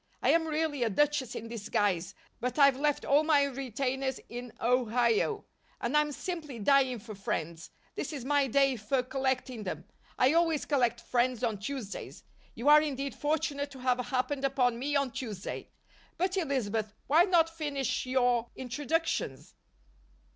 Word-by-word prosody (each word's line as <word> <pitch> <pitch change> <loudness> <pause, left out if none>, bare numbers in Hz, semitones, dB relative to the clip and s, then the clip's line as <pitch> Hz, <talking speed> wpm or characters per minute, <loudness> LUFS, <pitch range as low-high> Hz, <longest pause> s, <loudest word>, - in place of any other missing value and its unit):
"I - - +3
am 325 -1 +2
really 310 -3 -1
a 235 - +2
Duchess 285 +2 +1
in 230 - -5
disguise, 205 -5 -1 0.2
but 250 +3 -3
I've 280 -2 +6
left 290 +1 0
all 285 +2 +4
my 305 -3 +4
retainers 265 0 -2
in 245 0 -7
Ohio 245 - +1 0.3
and 240 +5 -2
I'm 300 0 +3
simply 305 -5 -5
dying 260 +3 +3
for 215 0 -9
friends. 170 -4 -4 0.2
This - - -4
is 275 -5 -6
my 285 0 +2
day 270 0 +3
for 235 +5 0
collecting 260 -2 -2
them 190 - -5 0.3
I 255 +3 +4
always 330 -3 +2
collect 240 -5 +1
friends 250 -1 0
on 220 -4 0
Tuesdays. 225 -2 -6 0.3
You 235 +5 -4
are 300 +1 +8
indeed 280 -2 -3
fortunate 290 -1 -1
to 270 -2 -12
have 255 0 +1
happened 255 +3 -1
upon 250 -3 +1
me 290 +3 -1
on 275 -2 +1
Tuesday. 225 -8 -6 0.5
But, 370 +1 0
Elizabeth, 225 - -1
why 320 +5 +5
not 345 -4 +4
finish 280 -6 -2
your 245 -2 +2
introductions?" 295 +6 -2
265 Hz, 155 wpm, -30 LUFS, 240-290 Hz, 0.5 s, are